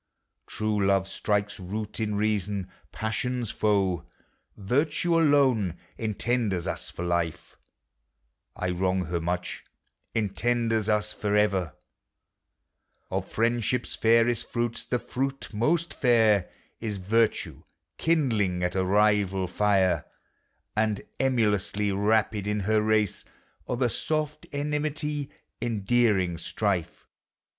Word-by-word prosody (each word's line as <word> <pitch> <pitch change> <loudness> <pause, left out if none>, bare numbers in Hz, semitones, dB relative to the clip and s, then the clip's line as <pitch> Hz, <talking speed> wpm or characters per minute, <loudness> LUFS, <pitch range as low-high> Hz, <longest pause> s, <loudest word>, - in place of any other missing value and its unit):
True 105 -1 -1
love 95 0 +3
strikes 105 +1 -1
root 105 +4 -5
in 105 -2 -1
reason; 100 -2 -1 0.2
passions 120 +1 -2
foe: 95 -5 +1 0.5
Virtue 145 - +1
alone 135 - +3 0.2
entenders 110 -4 -1
us - - -4
for 85 - -5
life: 85 -2 -2 1.0
I 90 0 -2
wrong 95 +1 0
her 85 0 -2
much— 90 +1 -3 0.5
entenders 110 +1 0
us 105 0 +1
for 105 0 -1
ever: 95 -6 +1 1.4
Of - - -3
Friendship's 120 +1 0
fairest 115 +1 +3
fruits, 120 -1 -2
the 125 - 0
fruit 135 +3 -3
most 165 +10 +1
fair 110 -7 +3 0.3
Is 105 -3 -3
virtue 110 +4 0 0.4
kindling 110 - +1
at 90 0 0
a 95 - +1
rival 100 -1 +3
fire, 95 0 +2 0.7
And, 110 -1 +1 0.2
emulously, 105 -5 +1
rapid 105 0 +1
in 105 0 0
her 105 +2 +2
race. 110 -2 +1 0.4
0 125 - -1
the 125 -1 +2
soft 155 +2 -2
enmity! 150 0 -2 0.3
endearing 105 -5 +1
strife! 100 -6 -2
105 Hz, 105 wpm, -27 LUFS, 95-120 Hz, 1.4 s, love